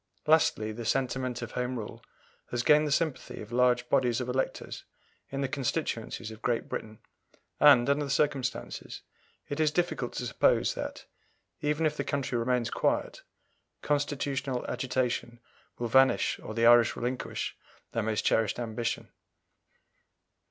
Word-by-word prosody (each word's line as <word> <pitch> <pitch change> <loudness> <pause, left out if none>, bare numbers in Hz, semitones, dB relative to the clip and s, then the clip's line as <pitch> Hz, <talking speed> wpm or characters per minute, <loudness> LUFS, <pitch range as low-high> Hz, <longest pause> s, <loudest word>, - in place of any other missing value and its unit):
Lastly, 150 -8 +3
the 115 +2 -6
sentiment 130 0 -1
of 120 - -6
Home 125 0 -2
Rule 105 -2 -7 0.5
has 120 0 -1
gained 150 +2 +5
the - - -2
sympathy 155 -1 -1
of 110 +1 -9
large 125 0 +3
bodies 120 -1 +2
of 125 - -3
electors 130 +1 -3 0.5
in 135 0 -3
the 135 - +1
constituencies 120 -5 -3
of 110 0 -11
Great 120 -2 0
Britain, 110 0 -6 0.6
and, 135 -4 +7
under 140 +1 +2
the - - -7
circumstances, 135 -2 -2 0.4
it 145 - -4
is 155 -1 +4
difficult 155 -6 -1
to 125 - -3
suppose 115 - +2
that, - - -6 0.6
even 150 +2 +1
if 150 -1 +1
the - - -2
country 140 -3 -2
remains 120 0 0
quiet, - - 0 0.6
constitutional 140 -3 -1
agitation 120 -2 -2 0.4
will 120 - -2
vanish 130 +3 +4
or 110 - -7
the 115 0 +2
Irish 120 0 +6
relinquish 125 +1 -3 0.4
their 115 - -1
most 110 0 -1
cherished 110 -2 +2
ambition. 115 -1 -3
125 Hz, 145 wpm, -29 LUFS, 120-140 Hz, 0.6 s, and